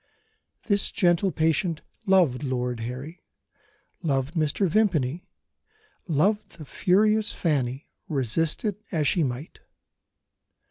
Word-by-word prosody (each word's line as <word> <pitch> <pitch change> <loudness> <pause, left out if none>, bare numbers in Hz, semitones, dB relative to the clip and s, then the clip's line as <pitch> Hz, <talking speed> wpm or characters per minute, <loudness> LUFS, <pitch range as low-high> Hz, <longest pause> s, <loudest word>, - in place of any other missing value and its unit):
This 200 -2 +2
gentle 175 +1 +2
patient 165 +1 0 0.3
loved 175 -10 +4
Lord 125 -3 -2
Harry, 130 +8 -6 0.8
loved 140 -2 0
Mr. 160 +3 +1
Vimpany, 170 -6 +1 0.8
loved 190 +7 +1
the 155 - -9
furious 210 +6 +2
Fanny, 135 -4 -1 0.2
resist 150 - 0
it 210 -1 -2
as 155 -6 +1
she 170 - +2
might. 130 +3 -5
160 Hz, 100 wpm, -26 LUFS, 135-190 Hz, 0.8 s, loved